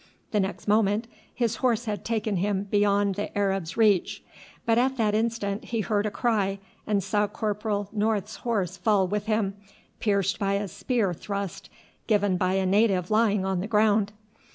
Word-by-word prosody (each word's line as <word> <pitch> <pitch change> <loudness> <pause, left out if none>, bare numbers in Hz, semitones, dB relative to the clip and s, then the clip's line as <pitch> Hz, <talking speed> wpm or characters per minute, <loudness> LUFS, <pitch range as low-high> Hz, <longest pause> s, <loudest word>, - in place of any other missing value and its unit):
The 210 - +2
next 190 +2 -3
moment 210 +1 +2 0.3
his 230 -2 -1
horse 240 -3 +1
had 210 -2 -3
taken 220 -3 -1
him 195 +1 0
beyond 205 -1 +3
the 205 +2 -4
Arab's 195 -4 -1
reach; 210 -5 +2 0.4
but 230 0 +3
at 260 +1 +1
that 215 -3 +1
instant 215 -2 -1
he 230 -2 -1
heard 210 0 0
a - - 0
cry 205 -3 0 0.3
and 205 -2 +1
saw 205 +2 +1
Corporal 210 -1 -2
North's 215 0 -1
horse 195 -6 -2
fall 195 0 +2
with 210 +2 -2
him, 215 -3 +1 0.5
pierced 200 -3 +1
by 200 -1 +1
a 200 +1 -1
spear 210 0 -1
thrust 200 +1 -5 0.4
given 205 -3 +2
by 185 +1 +1
a 190 0 +1
native 195 -2 +2
lying 210 -3 +3
on 190 -1 0
the 190 - -3
ground. 210 -1 +3
205 Hz, 170 wpm, -26 LUFS, 195-220 Hz, 0.5 s, beyond